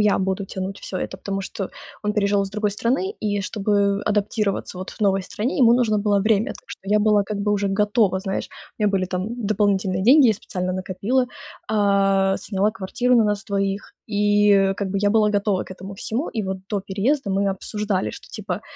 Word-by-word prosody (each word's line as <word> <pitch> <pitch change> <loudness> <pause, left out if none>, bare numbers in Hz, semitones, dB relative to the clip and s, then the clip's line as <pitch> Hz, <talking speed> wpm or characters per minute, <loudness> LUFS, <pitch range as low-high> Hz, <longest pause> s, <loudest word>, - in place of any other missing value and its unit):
я 210 -1 +3
буду 190 +1 -1
тянуть 190 +1 -5
всё 185 - -5
это, - - -3
потому 195 0 -4
что 190 0 -5 0.3
он 210 0 0
переезжал 200 -1 +2
из 195 - -4
другой 210 0 -1
страны, 265 - 0
и 205 -1 0
чтобы 200 0 +1
адаптироваться 210 -2 -1
вот 185 - -6
в - - -17
новой 195 -1 +2
стране, 220 +9 -3
ему 240 -2 +6
нужно 220 -4 +2
было 205 -1 +2
время. 215 0 +2
Так - - -8
что - - -8
я 210 +2 +3
была 210 -1 +4
как 210 0 -4
бы 205 +1 0
уже 200 -1 0
готова, 210 -2 +3
знаешь, 190 -1 -3 0.3
у - - -3
меня 205 - +3
были 185 - 0
там 185 +1 -3 0.2
дополнительные 195 -2 +1
деньги, 265 +4 +7
я - - +5
специально 185 -3 -4
накопила, 195 +8 0 0.4
а, 195 -2 +3
сняла 200 +1 0
квартиру 225 +5 0
на 225 - +5
нас 205 0 -1
двоих, 195 -1 -2 0.2
и 205 -1 +4
как 200 -2 -2
бы 195 - -6
я 205 0 +2
была 215 -1 +3
готова 200 -2 +1
к 185 - -9
этому 195 +2 -9
всему. 230 - -3
И 215 - 0
вот 190 0 -3
до 205 -2 0
переезда 215 +8 -1
мы 195 +1 +1
обсуждали, 205 0 -2
что - - -11
типа 200 -2 -4
205 Hz, 205 wpm, -22 LUFS, 195-210 Hz, 0.4 s, деньги